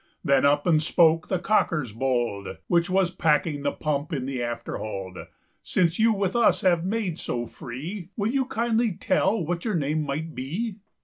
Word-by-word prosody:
Then 140 -1 +4
up 145 +1 +2
and 160 -3 +4
spoke 160 0 +3
the 185 - 0
caulkyers 170 - +1
bold, 120 -5 -1
Which 170 0 +2
was 185 -1 +2
packing 150 -3 +1
the - - 0
pump 150 -1 -2
in 135 -5 -2
the 135 -1 -3
afterhold:"Since 115 - -3
you 225 +1 +5
with 195 -2 -1
us 235 -1 +4
have 175 -3 +3
made 190 -3 -2
so 120 -1 -3
free, 160 - -7
Will 210 +1 0
you 265 0 +1
kindly 230 -2 0
tell 190 +2 +1
what 175 +1 -2
your 215 -4 -1
name 155 0 0
might 155 +3 -3
be?" 190 - -4
165 Hz, 170 wpm, -25 LUFS, 140-195 Hz, -, you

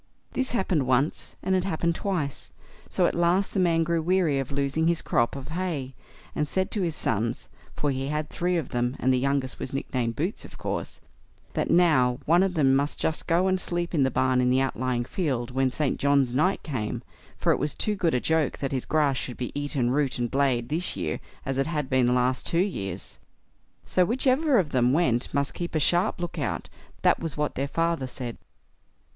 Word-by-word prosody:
This 265 0 -1
happened 180 - 0
once, 130 +4 0
and 190 - +1
it 185 -1 +2
happened 170 -2 0
twice; 165 -7 -3 0.4
so - - +2
at - - +2
last 175 +3 +2
the - - 0
man 165 -2 +3
grew 165 0 0
weary 170 -4 +2
of 135 -1 -4
losing 140 +3 0
his 170 -1 +2
crop 120 +2 +1
of 135 0 -7
hay, 155 -6 -3 0.4
and 150 - -1
said 190 +5 -1
to 210 - -1
his 170 -4 -1
sons—for 115 +6 -2
he 135 0 -2
had 150 +1 -2
three 180 0 -1
of 155 -6 -3
them, 120 +1 -1
and 130 +1 +2
the 130 - +2
youngest 140 0 -1
was 130 - -5
nicknamed 120 -4 -2
Boots, 175 - -2
of - - -12
course—that - - -6
now 130 -8 +4
one 170 +3 +5
of 190 -1 +1
them 135 -4 +4
must 140 +2 0
just 160 - -1
go 170 +3 +3
and 185 -1 +1
sleep 175 0 -2
in 155 - +2
the 130 - +4
barn 130 -1 +2
in 125 - +2
the 130 +1 +3
outlying 130 -1 -1
field 130 -7 -2
when 130 +1 +2
St. 140 +2 -1
John's 140 -3 +3
night 180 +9 +1
came, 115 -9 -3 0.3
for - - +2
it - - +1
was 150 - -1
too 210 - 0
good 170 -7 +1
a - - +3
joke 160 +1 +1
that 135 - -3
his 130 -2 -2
grass 145 -4 +2
should 125 0 -5
be 125 - -3
eaten, 145 -4 -1
root 140 -1 +1
and 120 -1 -2
blade, 130 -4 +1
this 170 +4 -1
year, 75 - -2 0.3
as 135 0 -1
it 135 - +1
had 150 -5 -2
been 130 -2 +4
the 125 - +3
last 125 +1 +1
two 165 - +1
years. 170 - -2 0.7
So 185 - +3
whichever 260 - +2
of 170 -8 +1
them 125 -1 +3
went 130 -7 +1
must 140 0 0
keep 175 -1 -5
a - - +3
sharp 175 +7 +2
look 175 -1 -4
out; - - -3 0.3
that - - +4
was 165 -2 -4
what 150 0 0
their 135 +1 -2
father 165 -2 0
said. 125 -2 -6
145 Hz, 210 wpm, -26 LUFS, 130-170 Hz, 0.7 s, one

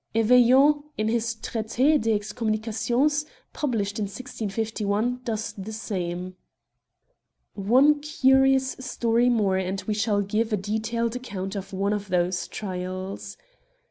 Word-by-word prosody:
Eveillon, 250 +6 +5 0.2
in 215 0 0
his 230 0 0
Traits 220 0 -5
des 265 -3 +3
Excommunications 225 +7 0
y 300 - -24 0.2
published 220 -8 -2
in 210 - 0
165 215 0 -4
i, 235 +5 0
does 220 -2 -3
the 200 +2 -7
same. 185 -4 -4 1.2
One 260 +9 +4
curious 265 -2 +3
story 235 -1 +1
more, 205 -6 +2
and 190 +1 -2
we 215 - -1
shall 210 -1 +1
give 215 +3 -1
a 210 - +2
detailed 220 +4 -2
account 200 -6 -5
of 195 0 -6
one 200 +2 0
of 205 -1 -4
these 180 0 0
trials. 185 - -5
220 Hz, 130 wpm, -25 LUFS, 195-245 Hz, 1.2 s, Eveillon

